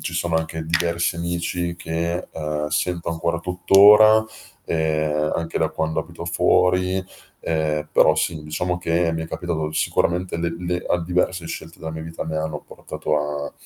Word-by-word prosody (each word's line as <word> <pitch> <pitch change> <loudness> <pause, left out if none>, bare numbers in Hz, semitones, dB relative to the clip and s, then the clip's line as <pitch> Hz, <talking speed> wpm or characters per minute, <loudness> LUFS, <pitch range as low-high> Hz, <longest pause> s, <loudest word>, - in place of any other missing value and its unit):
ci 80 +3 -4
sono 85 -1 0
anche 80 0 -3
diversi 85 +1 0
amici 85 0 -2
che, 85 +2 -3
ehm, 75 -1 -3
sento 85 +3 -1
ancora 85 0 -1
tuttora, 105 +5 +6 0.4
ehm, 75 -1 0
anche 85 0 -2
da - - +1
quando 80 0 -2
abito 85 +1 -9
fuori; 90 +2 +2 0.4
ehm, 75 -2 -1
però - - +5
sì, 80 -3 -1
diciamo 90 +3 -2
che 85 0 +1
mi 80 0 -2
è - - -5
capitato 80 -3 -3
sicuramente 90 +3 0
le 85 0 -2
le 90 0 -3
a 90 - +1
diverse 90 0 -1
scelte 80 0 -8
della 80 0 -5
mia 80 0 -6
vita 80 +1 -6
mi 80 -1 -4
hanno 80 -1 -3
portato 75 - -4
a, 75 0 -4
85 Hz, 165 wpm, -22 LUFS, 80-90 Hz, 0.4 s, tuttora